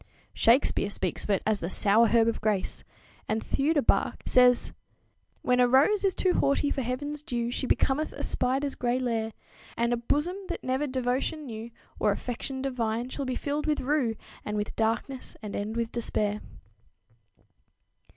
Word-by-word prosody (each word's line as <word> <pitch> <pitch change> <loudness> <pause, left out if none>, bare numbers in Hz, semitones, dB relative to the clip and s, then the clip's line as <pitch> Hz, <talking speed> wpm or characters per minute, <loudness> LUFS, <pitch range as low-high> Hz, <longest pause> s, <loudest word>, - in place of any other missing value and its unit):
Shakespeare 230 -4 +3
speaks - - -3
of - - -8
it 195 -2 +2
as 215 -2 +2
the 170 - -3
"sour 215 +4 +4
herb 230 0 +4
of 230 - -1
grace," 210 -3 -1 0.5
and 220 +1 +1
Theudobach 290 +1 +1
says: 250 -1 +4 0.7
"When 250 0 +2
a 250 - +6
rose 290 - +4
is 385 -2 +2
too 370 -2 +2
haughty 280 +1 +2
for 270 - -1
heaven's 285 +4 -3
dew 240 -4 -2
She 260 - -2
becometh 290 +5 +1
a - - -6
spider's 270 +2 0
gray 245 0 0
lair; 230 -3 -1 0.5
And 235 +1 +2
a - - +1
bosom, 295 +10 0
that - - -5
never 260 +3 0
devotion 260 +4 -1
knew 225 -2 -6 0.3
Or 210 - +3
affection 260 +5 -4
divine, 240 -2 -1
shall 280 +1 -4
be 255 -1 -2
filled 295 +3 -2
with 300 -1 +1
rue 260 -4 +1 0.3
And 210 0 -3
with 210 0 -3
darkness, 230 +4 -2
and 210 - -5
end 215 +3 -3
with 230 -1 -1
despair." 210 -3 -1
250 Hz, 165 wpm, -28 LUFS, 225-275 Hz, 0.7 s, a